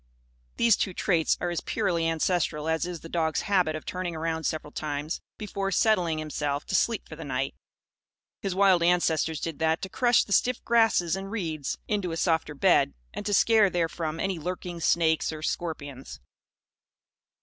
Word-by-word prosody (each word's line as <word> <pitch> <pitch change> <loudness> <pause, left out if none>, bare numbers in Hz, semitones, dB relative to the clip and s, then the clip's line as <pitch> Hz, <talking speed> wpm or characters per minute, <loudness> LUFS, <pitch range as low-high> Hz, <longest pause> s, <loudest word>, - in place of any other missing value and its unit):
These 230 -3 +4
two 185 - -2
traits 165 -4 +2
are 175 - -2
as 175 - -2
purely 175 -7 0
ancestral 160 -2 0
as 160 +2 0
is 175 -2 -6
the - - -9
dog's 160 -2 0
habit 180 -6 +1
of 155 - -7
turning 180 -2 -4
around 160 0 -2
several 155 -1 -4
times 150 +1 -4 0.2
before 200 -2 -3
settling 180 -5 +2
himself 150 -2 -3
to - - -6
sleep 230 - +1
for - - -9
the - - -8
night. - - -2 0.9
His 195 -2 -2
wild 190 -3 +5
ancestors 165 -3 +2
did 165 -3 -5
that, 160 0 +2
to 190 - -4
crush 240 +3 +3
the 200 - -3
stiff 250 +5 +1
grasses 225 -8 +3
and 195 0 -6
reeds 160 -10 -3
into 200 -5 -1
a 165 - -3
softer 160 -3 0
bed - - +3 0.2
and - - -5
to 205 - 0
scare 220 -1 +5
therefrom 165 -2 -2
any 190 -2 -1
lurking 180 +1 -5
snakes 160 -1 +2
or 155 -1 -7
scorpions. 145 -6 -4
170 Hz, 170 wpm, -27 LUFS, 160-195 Hz, 0.9 s, wild